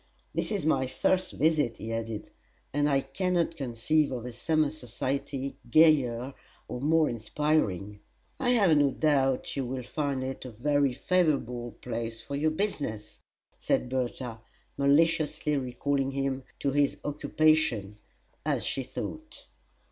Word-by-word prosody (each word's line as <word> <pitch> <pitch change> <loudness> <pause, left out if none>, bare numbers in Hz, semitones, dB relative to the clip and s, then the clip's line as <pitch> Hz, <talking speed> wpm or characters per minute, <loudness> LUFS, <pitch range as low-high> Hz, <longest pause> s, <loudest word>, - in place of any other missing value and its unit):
"This - - -1
is 200 -7 -1
my 135 -4 +2
first 185 +8 0
visit," 150 -6 +2
he 115 +2 -5
added; 115 -1 -4 0.4
"and 145 +1 +2
I 135 -1 +3
can 180 +8 -2
not 170 -1 +1
conceive 140 +3 +1
of 125 -2 -4
a 125 - -6
summer 155 +5 +1
society 135 0 -3
gayer 135 -4 +4 0.3
or 125 - -5
more 155 +2 +4
inspiring." 110 - 0 0.4
"I 255 - +1
have 200 -10 +5
no 145 -1 +4
doubt 135 -3 +1
you 135 - -1
will 130 0 -4
find 140 0 -2
it 130 0 -5
a 130 - -7
very 140 +4 +1
favorable 125 - 0
place 115 -1 -4
for 140 - -6
your 155 +3 +2
business," 150 - -3 0.4
said 125 - 0
Bertha, 125 -2 -3 0.3
maliciously 150 +1 +2
recalling 135 +1 -1
him 135 -1 -2 0.2
to 140 - +1
his 145 0 +2
occupation, 145 -8 +1 0.4
as - - 0
she 135 - -1
thought. 310 - -7
140 Hz, 140 wpm, -29 LUFS, 125-155 Hz, 0.4 s, have